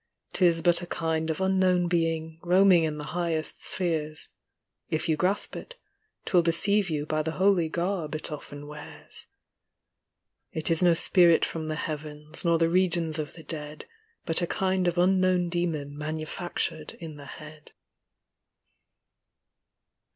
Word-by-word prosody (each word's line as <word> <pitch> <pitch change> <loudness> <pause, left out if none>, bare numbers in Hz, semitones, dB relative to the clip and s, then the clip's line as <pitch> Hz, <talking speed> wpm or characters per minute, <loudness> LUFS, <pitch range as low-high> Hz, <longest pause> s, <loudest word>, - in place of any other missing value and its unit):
'Tis 170 -3 +2
but 175 0 +3
a 175 - -7
kind 160 -1 -2
of 160 - -2
unknown 185 -2 +2
being, 165 -2 -1
Koaming 180 -1 +4
in 155 -1 -3
the 150 - -5
highest 170 -3 -3
spheres 155 -4 0 0.3
— - - -52
If 155 - -2
you 160 - +2
grasp 190 +5 0
it, - - -9 0.5
'twill 180 - +3
deceive 195 +4 +2
you 150 -2 -2
By 155 0 -1
the 160 +1 -3
holy 185 -3 +2
garb 170 -2 -2
it 155 - -4
often 145 -1 -7
wears. 145 - -10 1.2
It 160 +3 -1
is 165 - +5
no 175 -2 +4
spirit 170 -1 +6
from 160 -1 -5
the 155 - -2
heavens, 150 0 -4
Nor 170 -1 +3
the 165 0 +2
regions 170 -3 +1
of 150 -2 -5
the 165 - -11
dead; 150 -1 -6 0.4
But 165 +1 +2
a 175 - 0
kind 185 0 0
of 175 0 -1
unknown 185 -1 +2
demon 160 -5 -2
Manufactured 155 +1 -3
in 160 -3 -10
the 145 - -11
head. 155 +2 -12
165 Hz, 150 wpm, -27 LUFS, 155-180 Hz, 1.2 s, spirit